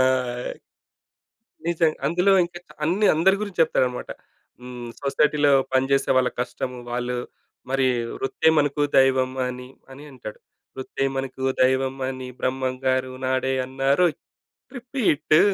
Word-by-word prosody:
ఆ! - - +6 1.7
నిజం 165 -2 +2
అందులో 180 +4 +3
ఇంకా 175 0 -7
చ - - -40
అన్ని 190 +7 +2
అందరి 190 +5 +4
గురించి 200 -5 -5
చెప్తాడనమాట. 125 -6 0 0.5
హ్మ్. 125 -1 -8
సొసైటీలో 145 +1 +2 0.2
పనిజేసే 135 +1 +2
వాళ్ళ 125 -1 +3
కష్టము 125 +1 -3
వాళ్ళు. 125 0 -2 0.5
మరి 135 -1 +2 0.3
వృత్తే 135 - -1
మనకు 145 0 0 0.2
దైవం 130 -1 +4 0.2
అని, 125 0 -7 0.2
అని 140 +2 -11
అంటాడు. 120 -5 -9 0.4
వృత్తే 130 +1 -4
మనకు 135 0 -4 0.2
దైవం 130 +1 +2
అని 130 -1 -6
బ్రహ్మం 130 0 -1
గారు 130 0 +1
నాడే 130 0 0
అన్నారోయ్ 135 +5 +1 0.6
రిపీటు 235 - +2
135 Hz, 120 wpm, -23 LUFS, 130-155 Hz, 1.7 s, ఆ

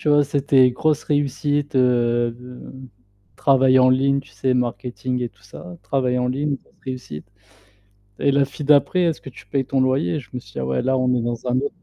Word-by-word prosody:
Tu - - -2
vois, 145 0 +5
c'était 140 -2 +3
grosse 150 +4 0
réussite, 145 0 -1
heu, 120 -2 +2 1.0
travail 130 -1 +4
en 130 0 +5
ligne, 135 +2 +2
tu 140 - -19
sais, 130 -1 -1
marketing 125 +1 -2
et 120 - -2
tout 100 -1 -30
ça. 175 - -11
Travail 130 -2 0
en 125 - 0
ligne 140 +2 -1
plus - - -27 0.2
réussite. 90 -12 -9 0.9
Et 140 - +2
la 140 0 +3
fille 145 +2 -8
d'après: 150 +5 +4
«Est-ce 165 -3 0
que - - -10
tu 105 -5 -15
payes 135 +5 -1
ton 135 -1 +1
loyer?» 135 +4 0
je - - -17
me 125 - -5
suis 100 -4 -18
dit: - - -7
«Ah - - -2
ouais 65 0 0
là 130 +1 +1
on 125 -1 +1
est 120 - 0
dans 120 +1 -4
un 125 - +1
autre 140 +1 -4
130 Hz, 215 wpm, -21 LUFS, 125-140 Hz, 1.0 s, vois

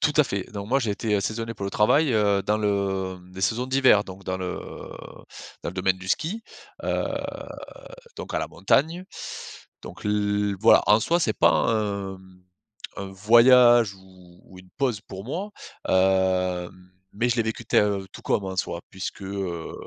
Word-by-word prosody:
Tout 155 - +2
à 150 - +6
fait. 100 -5 -3
Donc, 100 0 -6
moi, 135 +3 +3
j'ai 115 -5 -1
été, 105 +1 -1
heu, - - 0
saisonnier 115 +3 -3
pour 100 - -6
le 100 - -2
travail, 135 +6 +3
heu, 100 -2 +2
dans 105 +1 0
le, 100 -2 -1
hem, 90 0 -17
les 95 - -7
saisons 115 +6 0
d'hiver. 130 -6 +4
Donc, 95 0 -11
dans 95 - -2
le 90 -1 -4 1.0
dans - - -3
le - - -11
domaine 95 0 +1
du 95 +1 -9
ski, 195 - -1 0.4
heu, - - 0 1.1
donc - - -7
à - - +2
la - - -2
montagne. 165 +6 +1 0.8
Donc, - - -10
l 105 -1 0
voilà, 110 - +6
en 105 +1 +6
soi, 170 +8 +1
c'est 110 -8 +1
pas - - +5
un, 100 -3 0
mmh, 95 -1 -19 0.6
un 100 - -4
voyage 120 +1 +6
ou 90 -2 -18
ou 95 - -15
une 90 0 -16
pause 125 -7 0
pour 95 +1 -9
moi, 180 - -4 0.4
hem, 95 -1 +1 0.2
mais 115 +4 0
je 120 - +1
l'ai 115 - +3
vécu 110 0 -4
te - - 0
heu, 100 -2 +2
tout - - -11
comme, 100 - 0
en 95 -1 -5
soi, 85 -2 -2
puisque 95 +1 -6
heu 95 -4 -4
100 Hz, 185 wpm, -25 LUFS, 95-115 Hz, 1.1 s, à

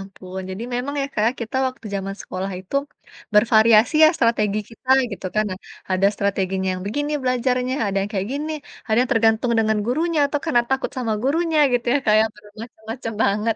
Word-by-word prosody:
ampun. 190 -1 -9
Jadi 190 +4 -6
memang 260 +4 -3
ya - - -1
Kak, 215 +2 +2
kita 235 +2 -4
waktu 255 -3 -6
jaman 195 0 -3
sekolah 185 +1 -5
itu, 190 +9 -4 0.6
bervariasi 220 +3 +5
ya - - +8
strategi 215 -4 +1
kita, 255 +3 -8 0.2
gitu 195 - -6
kan. 215 0 +2
Nah, 185 - -5 0.3
ada 185 +1 +3
strateginya 190 -1 -1
yang 185 0 -5
begini 290 +7 -2
belajarnya, 255 0 0
ada 195 - -2
yang 200 +1 -3
kayak 195 0 -2
gini, 300 +3 -3 0.3
ada 220 - +1
yang 255 +1 0
tergantung 225 +1 +2
dengan 220 -1 +2
gurunya 320 +6 0
atau 290 +1 -2
karena 265 -8 +3
takut 265 0 0
sama 230 -3 -1
gurunya, 320 +4 +1
gitu 245 0 0
ya, - - +4
kayak 215 +1 +5
bermacam-macam 220 +2 -8
banget. 215 +3 +1
225 Hz, 180 wpm, -22 LUFS, 200-255 Hz, 0.6 s, ya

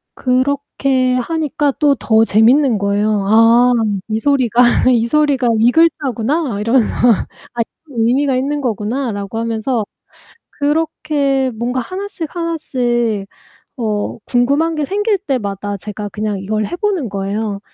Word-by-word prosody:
그렇게 260 0 0
하니까 295 +2 -1
또 290 -2 +4
더 220 -3 +2
재밌는 235 +4 +4
거예요. 200 +1 0
아, 230 +3 +5 0.4
'이 220 0 -1
소리가 245 -2 +2 0.3
이 235 -2 +2
소리가 285 -3 +2
이 235 +2 +4
글자구나.' 280 -5 +1
이러면서 230 +2 +2 0.7
아 240 - -1 0.3
'의미가 255 +3 +1
있는 285 +3 -1
거구나.'라고 225 -2 -3
하면서 230 0 -1 0.7
그렇게 290 -3 0
뭔가 245 +3 -2
하나씩 370 - -6
하나씩 245 - -1 0.5
어 215 -4 -2
궁금한 280 +7 +1
게 305 -1 -1
생길 410 +5 0
때마다 205 - -3
제가 205 +1 -6
그냥 210 -1 -3
이걸 215 +2 -2
해 350 - -5
보는 370 - -1
거예요. 200 +1 -3
250 Hz, 265 characters per minute, -16 LUFS, 220-285 Hz, 0.7 s, 아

